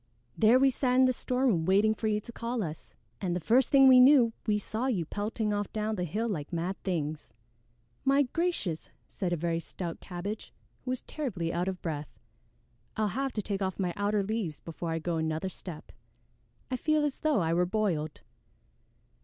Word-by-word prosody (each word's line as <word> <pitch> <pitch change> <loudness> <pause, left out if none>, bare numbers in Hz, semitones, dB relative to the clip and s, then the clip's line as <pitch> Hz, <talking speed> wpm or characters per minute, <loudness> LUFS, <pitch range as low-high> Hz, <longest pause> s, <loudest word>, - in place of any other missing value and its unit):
"There 225 +3 +5
we 270 +1 +4
sat 250 -1 +1
in 260 0 +6
the 255 - +3
storeroom 250 -8 +1
waiting 200 +5 +4
for 220 0 -3
you 210 -1 +1
to 235 - -10
call 230 0 -3
us, 155 -2 -7 0.3
and 180 -3 -1
the - - 0
first 235 +9 +3
thing 270 -2 +7
we 255 -1 +9
knew 250 -3 +7
we 210 -1 +3
saw 220 +4 -2
you 195 -11 0
pelting 210 +3 -2
off 205 -1 -2
down 215 0 -1
the 180 -4 -2
hill 215 +8 -2
like 160 -8 -4
mad 175 +3 -3
things." 155 - -3 0.7
"My 275 +1 +4
gracious!" 275 - -2 0.2
said 185 -3 -3
a - - +2
very 165 0 -1
stout 170 0 -6
Cabbage, 195 +4 -6 0.3
who - - -4
was 255 -1 -1
terribly 185 - -3
out 175 +2 -1
of 190 -1 -4
breath, 150 -3 -3 0.9
"I'll 215 -1 +1
have 270 +6 -2
to 210 - -2
take 200 0 -3
off 190 -1 -1
my 180 -3 -1
outer 205 0 +1
leaves 200 -7 -3
before 165 0 -6
I 165 - -1
go 165 +1 -2
another 160 +3 -1
step. 175 -3 -9 0.8
I 255 - 0
feel 310 +3 +2
as 290 -2 -1
though 305 -5 +2
I 165 0 +1
were 175 +1 +2
boiled." 180 -7 -1
205 Hz, 195 wpm, -29 LUFS, 175-245 Hz, 0.9 s, we